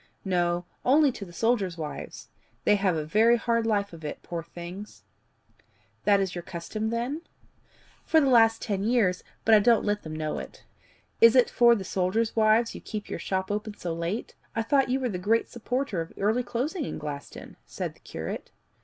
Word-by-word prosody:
"No 175 -2 0 0.2
only 285 +2 +5
to 205 - -8
the 175 - -13
soldiers' 195 -3 0
wives. 155 -2 -7 0.3
They 210 - +4
have 195 -3 +1
a 155 -1 -2
very 225 +8 +4
hard 230 -1 0
life 200 -3 0
of 165 -1 -11
it, 150 - -6
poor 170 -1 -4
things!" 175 +5 -9 1.0
"That 205 -1 +5
is 190 -2 -1
your 175 - -4
custom, 185 +6 -4
then?" 240 +7 -2 0.8
"For 320 - +4
the 295 - +3
last 225 -3 +5
ten 200 -2 -1
years, 215 -5 +2 0.2
but 225 - +5
I 215 - +9
don't 230 +2 +4
let 210 0 0
them 155 -1 -7
know 155 -1 -2
it." - - -10 0.6
"Is 230 +2 +8
it 250 -2 +5
for 235 0 +6
the 200 - -4
soldiers' 195 +5 0
wives 220 +1 +3
you - - -9
keep 210 -1 -6
your - - -3
shop 190 0 -2
open 210 0 -4
so 170 -2 -3
late? 170 +6 -3 0.2
I 225 - 0
thought 270 +3 +2
you 260 +2 +1
were 260 - -1
the 180 -4 -3
great 220 +5 +1
supporter 240 -4 -2
of 165 - -8
early 220 +5 +1
closing 275 +8 -2
in - - -5
Glaston," 145 -2 -8
said - - -4
the - - -25
curate. - - -6
210 Hz, 195 wpm, -27 LUFS, 180-235 Hz, 1.0 s, I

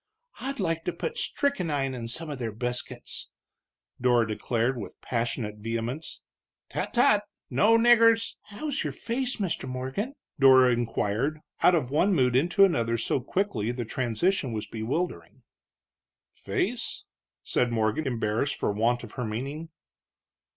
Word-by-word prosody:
"I'd 275 0 -4
like 165 -4 0
to 180 - -1
put 475 +1 -4
strickenine 160 - 0
in 120 -2 -5
some 160 +8 -3
of 140 - -5
their 115 -3 -2
biscuits!" 120 +3 -4 0.7
Dora 120 -2 +4
declared, 115 +3 0
with 100 - -8
passionate 115 -3 -2
vehemence. 115 +7 -4 0.5
"Tut - - -3
tut! 210 -4 +5 0.3
no 225 +2 +5
niggers 230 -1 +5
" - - -62
"How's 275 +7 -3
your - - -3
face, 250 +2 -2
Mr. 185 - -2
Morgan?" 130 - -3 0.2
Dora 130 -2 +7
inquired, 120 +4 0 0.2
out 180 - +6
of 135 -6 -1
one 185 +7 +3
mood 125 -4 +3
into 175 +8 +5
another 115 -10 +1
so 115 - 0
quickly 125 - -1
the 120 -1 -4
transition 130 - 0
was 105 -1 -3
bewildering. 110 - -4 0.9
"Face?" - - -2 0.4
said 120 -1 +1
Morgan, 110 +6 0
embarrassed 115 +2 0
for - - -1
want 115 +4 +1
of 115 - -9
her 125 - -4
meaning. 135 +9 -4
130 Hz, 140 wpm, -27 LUFS, 115-180 Hz, 0.9 s, Dora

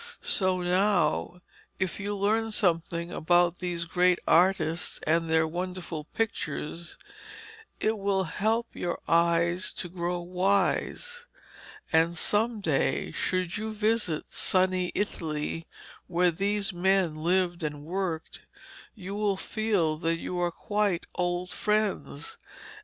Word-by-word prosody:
So 185 -2 +2
now 180 -1 +1 0.3
if 190 0 -2
you 205 0 -2
learn 220 +3 +1
something 170 -4 0
about 175 +1 +2
these 175 -2 -2
great 180 +1 +3
artists 165 -2 +3
and 165 +1 +2
their 160 0 +3
wonderful 175 -2 -4
pictures, 170 -5 -3 0.8
it 215 0 0
will 195 -1 +1
help 220 +7 0
your 175 - -2
eyes 170 +2 +2
to 175 - -3
grow 175 0 -2
wise. 200 - 0 0.7
And 165 +2 +3
some 215 +4 +2
day 155 -7 0
should 185 -1 -1
you 220 +1 -3
visit 215 -6 0
sunny 185 -1 +2
Italy, 165 -4 -2 0.4
where 180 0 +3
these 200 +3 -1
men 185 -1 +2
lived 175 +2 +1
and 150 -2 -4
worked, 175 -2 -3 0.5
you 195 -2 -7
will 205 -1 0
feel 195 -8 0
that 165 0 0
they - - -7
are 175 -1 0
quite 205 0 -1
old 180 0 -1
friends. 210 -10 -1
180 Hz, 120 wpm, -28 LUFS, 170-200 Hz, 0.8 s, great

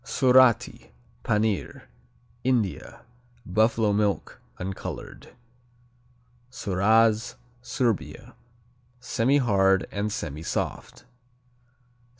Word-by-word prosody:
Surati, 130 -1 +3 0.3
Panir 105 -2 -1 0.6
India 120 -7 -1 0.4
Buffalo 110 +2 +2
milk. 105 -1 -1 0.2
Uncolored. 95 +1 -7 1.2
Suraz 110 +1 +1 0.3
Serbia 120 -3 -3 0.7
Semihard 115 -6 +2
and 105 +1 -2
semisoft. 80 +4 -5
110 Hz, 55 wpm, -25 LUFS, 100-120 Hz, 1.2 s, Surati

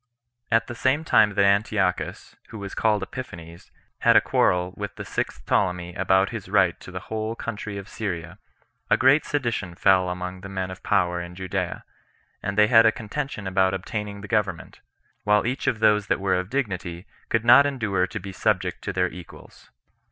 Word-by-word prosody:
1. 115 - +3
At 115 - -3
the 120 - -7
same 130 +6 +1
time 105 -9 +4
that 100 -1 +4
Antiochus, 100 -2 0
who 110 - -8
was 100 -1 -7
called 105 -3 +1
Epiphanes, 85 -9 -9 0.3
had - - +4
a - - +9
quarrel 90 0 +1
with 100 0 -6
the - - -7
sixth - - -4
Ptolemy 90 -2 0
about 95 +2 +2
his 110 -5 -7
right 95 -3 +3
to - - -11
the 95 0 -6
whole 110 +1 -4
country 105 -3 -5
of 100 0 -8
Syria, 90 -4 -5 0.5
a - - +4
great 135 +4 +4
sedition 115 -10 -2
fell 95 -1 +3
among 90 +1 -5
the 95 - -8
men 95 -1 -3
of 95 - -10
power 90 -3 +1
in 85 0 -8
Judea, 95 -1 -3 0.6
and 100 +1 -4
they 105 - +7
had 115 0 +6
a - - +5
contention 110 0 -5
about 95 0 +2
obtaining 100 +1 -5
the 105 - -8
government; 100 -7 -2 0.4
while 105 0 +3
each 125 +3 -2
of 120 -4 0
those 105 -2 +3
that - - +1
were 95 -1 0
of 90 +1 -1
dignity 95 -9 -3 0.2
could 115 0 0
not 125 +4 +8
endure 105 -9 0
to - - -6
be 95 +1 -8
subject 95 0 -1
to - - -1
their 90 0 +1
equals. 90 -1 -13
100 Hz, 190 wpm, -24 LUFS, 90-110 Hz, 0.6 s, a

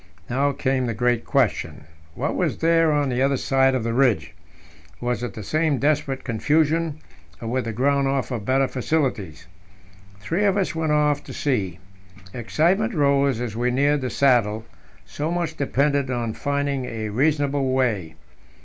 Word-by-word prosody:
Now 140 +3 +2
came 130 -2 -1
the 115 - -2
great 120 +1 +1
question: - - 0 0.3
What - - -2
was - - 0
there 165 -1 +3
on 145 -2 +1
the 125 0 -1
other 135 0 +2
side 135 0 +2
of 125 - -1
the 115 0 -1
ridge? 125 -3 +2 0.7
Was 120 -1 -2
it 120 -5 -5
the 110 - -6
same 155 +4 +1
desperate 140 -1 0
confusion, 155 +6 +1 0.4
or 115 - -6
would 130 0 -1
the 115 - -2
ground 140 +4 +1
offer 135 -3 -1
better 130 +5 +1
facilities? 125 - -2 0.7
Three 165 - -1
of 200 0 +2
us 190 -4 0
went 160 -1 -1
off 150 -1 +2
to - - -8
see. 100 - -1 0.6
Excitement 175 - +1
rose 140 -4 +2
as 120 -3 -4
we 120 +2 0
neared 140 +3 +2
the 130 - -2
saddle; 115 -5 +2 0.4
so 150 +2 -4
much 170 -2 -2
depended 140 -1 0
on 120 -3 -2
finding 140 -1 -2
a 110 -3 -4
reasonable 140 +2 +1
way. 110 -12 0
135 Hz, 160 wpm, -23 LUFS, 120-150 Hz, 0.7 s, there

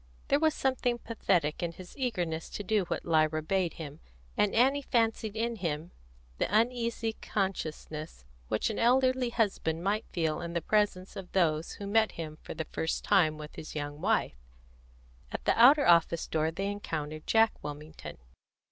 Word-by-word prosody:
There 280 - +4
was 315 -1 +2
something 250 -2 0
pathetic 180 -10 0
in 170 -1 -2
his 180 +1 -12
eagerness 180 - -2
to 205 - -5
do 205 -1 +1
what - - -3
Lyra 155 -1 +2
bade 180 +1 0
him, 150 -1 -8 0.4
and 205 - +2
Annie 270 +5 +4
fancied 225 -4 0
in 230 +1 -1
him 165 -2 -3 0.5
the - - +2
uneasy 230 0 +1
consciousness 155 - -4 0.2
which 110 - 0
an 215 - -4
elderly 255 +1 +3
husband 195 -8 0
might 205 +3 0
feel 160 -3 -1
in 170 0 -5
the 170 - +1
presence 205 -2 0
of 190 -3 -8
those 165 -3 +1
who 200 - -7
met 220 +2 +2
him 155 -2 -7
for - - -8
the 160 - -3
first 160 - -2
time 160 -7 +3
with 150 0 -9
his 155 - -8
young 145 0 -4
wife. - - +1 0.9
At - - -5
the - - +4
outer 275 +5 +7
office 170 -1 +4
door 160 0 +1
they 195 +5 -2
encountered 155 -6 -5
Jack 225 0 +3
Wilmington. 145 - -8
185 Hz, 165 wpm, -30 LUFS, 155-225 Hz, 0.9 s, outer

